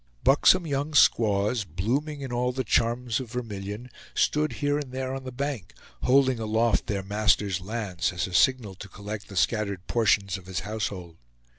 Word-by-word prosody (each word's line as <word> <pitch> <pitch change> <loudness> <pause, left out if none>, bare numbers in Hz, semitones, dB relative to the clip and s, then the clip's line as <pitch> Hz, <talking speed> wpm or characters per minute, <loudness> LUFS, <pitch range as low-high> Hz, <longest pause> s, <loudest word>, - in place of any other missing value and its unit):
Buxom 170 +6 +5
young 145 +1 -2
squaws, 105 -3 +3
blooming 125 - -2
in 130 -3 -5
all 125 +1 +1
the 130 +1 -2
charms 120 +1 +1
of 130 -3 -7
vermilion, 110 0 -5 0.2
stood 150 0 +1
here 145 0 0
and 140 -4 -7
there 130 0 -3
on 135 0 -6
the 130 - -5
bank, 135 -6 -4 0.3
holding 130 -1 +3
aloft 110 +1 +1
their 100 -2 -2
master's 100 -2 +1
lance, 100 -4 -2
as 90 -1 -2
a 95 - -8
signal 115 0 +3
to 100 +2 -10
collect 100 +2 -7
the 100 - -11
scattered 100 -1 0
portions 100 -4 +1
of 90 - -17
his 95 -3 -3
household. 95 -5 -5
110 Hz, 170 wpm, -26 LUFS, 100-130 Hz, 0.3 s, Buxom